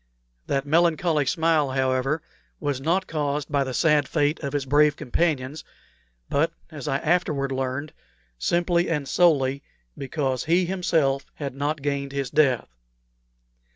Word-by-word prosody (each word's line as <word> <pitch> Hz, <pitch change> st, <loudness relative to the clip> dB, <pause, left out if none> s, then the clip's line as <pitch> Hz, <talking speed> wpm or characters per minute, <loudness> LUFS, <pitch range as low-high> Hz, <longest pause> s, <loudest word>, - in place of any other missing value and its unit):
That 135 Hz, 0 st, 0 dB
melancholy 160 Hz, -1 st, +2 dB
smile, 160 Hz, -2 st, +2 dB
however, 130 Hz, +3 st, 0 dB, 0.4 s
was 145 Hz, -3 st, -2 dB
not 175 Hz, +6 st, +1 dB
caused 150 Hz, -2 st, -2 dB
by 140 Hz, -2 st, +2 dB
the 130 Hz, -, -4 dB
sad 150 Hz, -4 st, +3 dB
fate 150 Hz, -1 st, +1 dB
of 140 Hz, -3 st, -4 dB
his 145 Hz, -2 st, -1 dB
brave 150 Hz, +2 st, +4 dB
companions, 150 Hz, -1 st, -1 dB, 0.6 s
but, 160 Hz, +3 st, +1 dB, 0.2 s
as 150 Hz, -3 st, -7 dB
I 135 Hz, -2 st, +1 dB
afterward 150 Hz, -4 st, 0 dB
learned, 135 Hz, +3 st, -3 dB, 0.5 s
simply 175 Hz, -, +1 dB
and 150 Hz, -4 st, -1 dB
solely 140 Hz, -3 st, +3 dB, 0.3 s
because 135 Hz, -2 st, -2 dB
he 175 Hz, +3 st, +3 dB
himself 165 Hz, -7 st, 0 dB
had 140 Hz, -3 st, -5 dB
not 145 Hz, +2 st, -2 dB
gained 140 Hz, -1 st, -2 dB
his 140 Hz, -3 st, -3 dB
death. 130 Hz, -, +2 dB
145 Hz, 135 wpm, -24 LUFS, 135-160 Hz, 0.6 s, brave